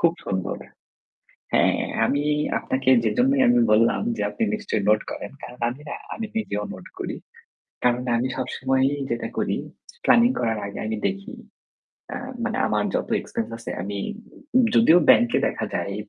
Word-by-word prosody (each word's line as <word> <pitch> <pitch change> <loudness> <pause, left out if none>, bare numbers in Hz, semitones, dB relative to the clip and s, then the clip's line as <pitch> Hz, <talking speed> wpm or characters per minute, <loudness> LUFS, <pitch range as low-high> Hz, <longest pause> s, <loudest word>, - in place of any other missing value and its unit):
খুব 170 -1 +4
সুন্দর। 95 -1 -2 1.0
হ্যাঁ, - - +3 0.3
আমি 145 +1 +1 0.4
আপনাকে 130 0 0
যেজন্যই 130 +5 +3
আমি 120 0 +5
বললাম, 115 +2 +4 0.2
যে - - -2
আপনি 230 - -5
নিশ্চয়ই 190 - -2
নোট 110 0 +5
করেন। - - -6
কারণ 125 0 -10
আমি 135 +4 -9
না - - -4 0.2
আমি 225 0 -4
নিজেও 105 - -2
নোট 95 - -11
করি। - - -4 0.7
কারণ 125 0 +3
আমি 125 +2 0
সবসময়ই 130 +2 0
যেটা 120 0 -2
করি - - 0 0.5
প্ল্যানিং 240 +1 +6
করার 115 -2 0
আগে 100 - -7
আমি 110 0 -2
দেখি 200 +6 -6 0.8
অ্যাঁ 250 - -5 0.2
মানে 240 +1 -1
আমার - - +1
যত - - -1
এক্সপেন্স 230 -1 -4
আছে 115 - -7
আমি 100 +1 -4 0.8
যদিও 180 -7 +7
ব্যাংকে 120 0 +6
দেখা - - -2
যায় 100 - -2
130 Hz, 155 wpm, -24 LUFS, 110-175 Hz, 1.0 s, যদিও